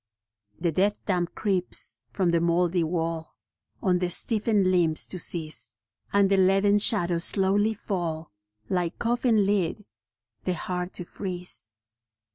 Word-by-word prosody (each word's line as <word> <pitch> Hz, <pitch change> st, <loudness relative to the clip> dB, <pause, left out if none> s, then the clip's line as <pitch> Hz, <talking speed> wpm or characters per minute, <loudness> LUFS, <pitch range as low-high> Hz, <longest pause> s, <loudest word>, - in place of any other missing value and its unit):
The 170 Hz, -1 st, 0 dB
death 200 Hz, +5 st, +1 dB
damp 175 Hz, -3 st, -1 dB
creeps 190 Hz, -4 st, +1 dB
from 185 Hz, -3 st, 0 dB
the 170 Hz, -, +2 dB
mouldy 170 Hz, +1 st, +1 dB
wall 165 Hz, -1 st, -3 dB, 0.5 s
On 180 Hz, -3 st, +2 dB
the 180 Hz, -1 st, -1 dB
stiffened 210 Hz, -1 st, +1 dB
limbs 165 Hz, -4 st, +2 dB
to 185 Hz, -, -7 dB
seize, 155 Hz, -9 st, -1 dB, 0.3 s
And 200 Hz, -1 st, +4 dB
the 195 Hz, -, +4 dB
leaden 195 Hz, +2 st, +3 dB
shadows 175 Hz, -5 st, +3 dB
slowly 205 Hz, +3 st, +2 dB
fall, 170 Hz, -, -4 dB, 0.4 s
Like 175 Hz, +1 st, -2 dB
coffin 235 Hz, -3 st, +1 dB
lid, 200 Hz, 0 st, -1 dB, 0.6 s
the 185 Hz, -, -1 dB
heart 180 Hz, +2 st, -4 dB
to 180 Hz, -, -4 dB
freeze. 180 Hz, -, -5 dB
180 Hz, 130 wpm, -26 LUFS, 170-200 Hz, 0.6 s, And